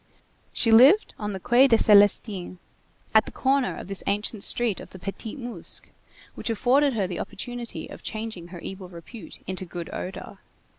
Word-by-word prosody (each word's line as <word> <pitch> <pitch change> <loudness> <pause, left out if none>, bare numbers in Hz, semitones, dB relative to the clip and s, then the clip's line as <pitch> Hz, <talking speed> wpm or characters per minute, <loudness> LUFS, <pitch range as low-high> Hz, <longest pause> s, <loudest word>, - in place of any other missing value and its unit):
She 230 - +1
lived 270 - +6
on 210 -1 -3
the 190 - -5
Quai 245 +7 +5
des 230 -3 +5
Célestins, 205 -3 +3 0.6
at 220 -1 +6
the - - -8
corner 270 -1 0
of - - -8
this 195 -1 0
ancient 205 +1 -1
street 230 -1 +2
of - - -10
the - - -11
Petit 200 +6 -6
Musc 240 -9 -6 0.5
which - - -3
afforded 260 +5 +3
her 210 -4 0
the 180 -2 -5
opportunity 240 +2 -6
of - - -11
changing 215 -6 -6
her 175 0 -10
evil 190 -1 -8
repute 175 +2 -11
into 190 0 -4
good 175 -1 -7
odor. 185 - -7
210 Hz, 170 wpm, -25 LUFS, 190-240 Hz, 0.6 s, lived